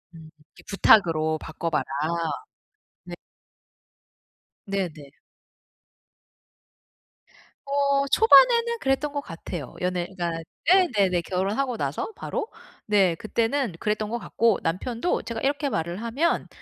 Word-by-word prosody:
음 160 Hz, -1 st, -12 dB, 0.2 s
이게 -, -, -17 dB
부탁으로 165 Hz, -6 st, +4 dB
바꿔 165 Hz, +2 st, -5 dB
봐라. 160 Hz, -, 0 dB, 1.2 s
네. -, -, -10 dB, 1.5 s
네네. 180 Hz, -8 st, -4 dB, 2.6 s
어 280 Hz, 0 st, +1 dB
초반에는 470 Hz, -, +5 dB
그랬던 270 Hz, +2 st, 0 dB
것 285 Hz, 0 st, -3 dB
같아요. 165 Hz, -, -8 dB
연애가 180 Hz, -1 st, -2 dB, 0.4 s
네네네. 210 Hz, -, +3 dB
결혼하고 205 Hz, +9 st, -1 dB
나서 140 Hz, -, -3 dB
바로. -, -, -4 dB, 0.4 s
네 195 Hz, -5 st, +3 dB
그때는 230 Hz, -, -1 dB
그랬던 210 Hz, 0 st, -1 dB
것 235 Hz, -, -2 dB
같고 225 Hz, +1 st, +1 dB
남편도 230 Hz, -, -1 dB
제가 230 Hz, -1 st, -5 dB
이렇게 285 Hz, +1 st, 0 dB
말을 170 Hz, -1 st, -3 dB
하면 265 Hz, +9 st, 0 dB
210 Hz, 225 characters per minute, -25 LUFS, 175-275 Hz, 2.6 s, 초반에는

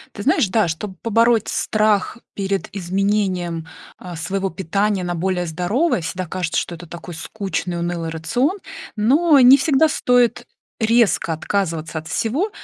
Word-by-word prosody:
Ты 205 Hz, -, -6 dB
знаешь, 295 Hz, -, +3 dB
да, 215 Hz, -2 st, +2 dB
чтоб 185 Hz, +3 st, -5 dB
побороть 230 Hz, 0 st, +2 dB
страх 215 Hz, 0 st, +1 dB, 0.2 s
перед 195 Hz, -1 st, -2 dB
изменением, 185 Hz, -3 st, -1 dB, 0.3 s
а, 180 Hz, -1 st, -8 dB
своего 190 Hz, +4 st, -2 dB
питания 195 Hz, +3 st, -1 dB
на 175 Hz, 0 st, -2 dB
более 180 Hz, +1 st, -1 dB
здоровое, 180 Hz, -, 0 dB
всегда 185 Hz, +3 st, -4 dB
кажется, 175 Hz, -1 st, -1 dB
что 175 Hz, -, -5 dB
это 170 Hz, +1 st, -10 dB
такой 170 Hz, +1 st, -9 dB
скучный 180 Hz, 0 st, -4 dB
унылый 170 Hz, -1 st, -3 dB
рацион, 245 Hz, -, -1 dB, 0.4 s
но 280 Hz, +8 st, +4 dB
не 255 Hz, +2 st, +9 dB
всегда 305 Hz, +1 st, +3 dB
стоит 245 Hz, -4 st, +2 dB, 0.3 s
резко 225 Hz, -7 st, +2 dB
отказываться 160 Hz, -2 st, -2 dB
от 160 Hz, -, -9 dB
всего. 275 Hz, -, -1 dB
195 Hz, 140 wpm, -20 LUFS, 170-230 Hz, 0.4 s, не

